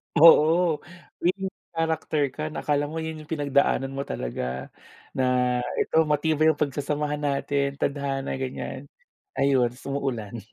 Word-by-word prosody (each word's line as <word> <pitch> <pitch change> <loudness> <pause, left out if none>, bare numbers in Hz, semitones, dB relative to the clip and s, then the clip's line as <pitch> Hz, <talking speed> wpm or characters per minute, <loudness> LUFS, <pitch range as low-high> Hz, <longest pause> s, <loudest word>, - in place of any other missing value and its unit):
Oo, 165 +1 +6 0.4
main 185 +3 +1 0.3
character 160 -2 0
ka, 155 - -5
na 155 - -5
akala 145 -1 +1
mo 160 +2 -6
'yun 160 -1 -5
'yung 155 - -12
pinagdaanan 140 -2 +1
mo 135 0 -3
talaga, 65 +1 -4 0.4
na 130 - -1 0.6
ito - - -1
matibay 155 +1 +2
yung 155 -2 +3
pagsasamahan 150 +1 -1
natin, 140 -1 0
tadhana, 140 -1 -2
ganiyan. 130 +1 -5 0.5
Ayun 135 -3 +3
'tas 125 - -16
umuulan. 125 -6 -3
145 Hz, 130 wpm, -26 LUFS, 135-155 Hz, 0.6 s, Oo